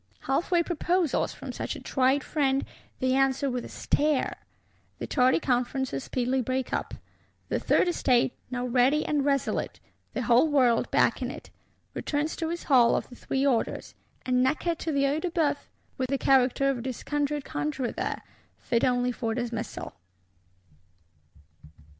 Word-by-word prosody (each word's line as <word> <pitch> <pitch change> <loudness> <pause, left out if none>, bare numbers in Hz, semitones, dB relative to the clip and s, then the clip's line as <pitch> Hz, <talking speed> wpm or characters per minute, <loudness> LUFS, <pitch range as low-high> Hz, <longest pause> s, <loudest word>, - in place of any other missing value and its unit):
Half 270 +6 -1
way 345 -2 +3
proposals, 345 -1 0
from - - -7
such - - -4
a - - -7
tried 265 +1 +1
friend, 275 -3 0 0.3
they 255 -1 +1
answer 270 +1 +2
with 250 -1 -3
a - - -9
stare. 295 -2 0 0.6
The - - -5
tardy 255 +1 +3
conferences 250 - -1
speedily 255 +1 0
break 260 +1 -2
up; - - -2 0.5
the - - 0
Third - - +2
Estate, 255 -8 +2 0.2
now 250 -1 -3
ready 255 +5 +3
and 295 -2 +1
resolute, 275 -1 -1 0.3
the 255 - -2
whole 240 +6 +5
world 255 -6 +3
backing - - +2
it, - - -9 0.4
returns 300 +1 -2
to 325 - -2
its 340 +1 -4
Hall 245 -4 +5
of - - -3
the 245 - -11
Three 270 +3 -1
Orders; 250 -5 0 0.3
and 250 -1 +2
Necker 305 +6 +1
to 325 0 -4
the 280 -1 +1
Œil 285 +3 +1
de 360 - -1
Bœuf, 320 -4 +1 0.4
with 255 -1 -1
the 275 - +1
character 270 0 +3
of 270 -3 0
a - - -5
disconjured 285 +3 -2
conjuror 150 - -2
there—fit 235 -3 -4
only 250 0 +2
for 225 -2 -3
dismissal. 240 -2 -4
265 Hz, 155 wpm, -27 LUFS, 250-290 Hz, 0.6 s, whole